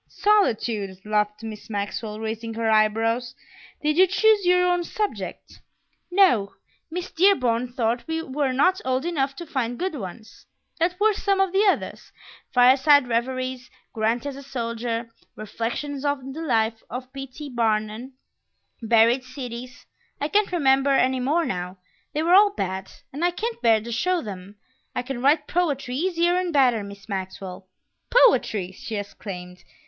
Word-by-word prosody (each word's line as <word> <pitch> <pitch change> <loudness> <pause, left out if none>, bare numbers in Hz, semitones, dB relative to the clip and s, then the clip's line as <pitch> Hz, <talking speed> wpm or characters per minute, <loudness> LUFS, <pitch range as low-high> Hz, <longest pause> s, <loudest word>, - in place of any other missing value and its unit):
"Solitude!" 225 - +1
laughed 210 0 0
Miss 220 -1 -8
Maxwell, 210 +1 -4
raising 225 +1 -4
her 225 -1 0
eyebrows. 225 +3 +1 0.5
"Did 305 +1 +1
you 375 +1 +7
choose 410 0 +3
your 360 0 +4
own 355 -1 +2
subject?" 420 +4 -5 0.5
"No; 355 - +3 0.3
Miss 360 +3 -5
Dearborn 250 -10 +3
thought 235 0 -1
we 325 0 -2
were 275 -2 -1
not 365 +9 +2
old 260 +3 -1
enough 275 -5 -1
to 345 - -7
find 245 -6 -2
good 375 0 -2
ones." 220 -3 -9 0.3
"What 355 +3 0
were 430 +1 +4
some 395 -1 0
of 385 -1 +2
the 405 +2 +4
others?" 390 - -1 0.4
"Fireside 265 +2 +5
Reveries, 255 +2 -2 0.2
Grant 225 +3 0
as 285 -1 -4
a 275 - -9
Soldier, 230 -3 -4 0.2
Reflections 240 +6 -4
on 280 -2 -2
the 320 - -6
Life 225 -6 0
of 255 +2 -7
P. 270 0 -6
T. 290 +3 -9
Barnum, 225 0 -1 0.7
Buried 230 +3 +4
Cities; 250 -1 -8 0.3
I 290 - -2
can't 415 +1 +2
remember 275 -5 +3
any 260 0 +2
more 300 +7 +1
now. 180 -3 -4 0.4
They 305 - 0
were 345 +2 +3
all 405 +1 +6
bad, 190 0 -3 0.2
and 295 +5 -4
I 350 - +4
can't 450 +6 -4
bear 225 -2 +4
to 235 +2 -7
show 360 +10 +1
them; 195 -1 -8 0.4
I 250 - -1
can 250 -1 -5
write 295 +3 +3
poetry 290 -8 -1
easier 345 +2 +1
and 365 -1 -1
better, 255 -7 +3
Miss 200 0 -11
Maxwell." 190 -1 -6 0.4
"Poetry!" 235 - +3
she 215 +4 -7
exclaimed. 190 -3 -7
255 Hz, 155 wpm, -24 LUFS, 225-325 Hz, 0.7 s, you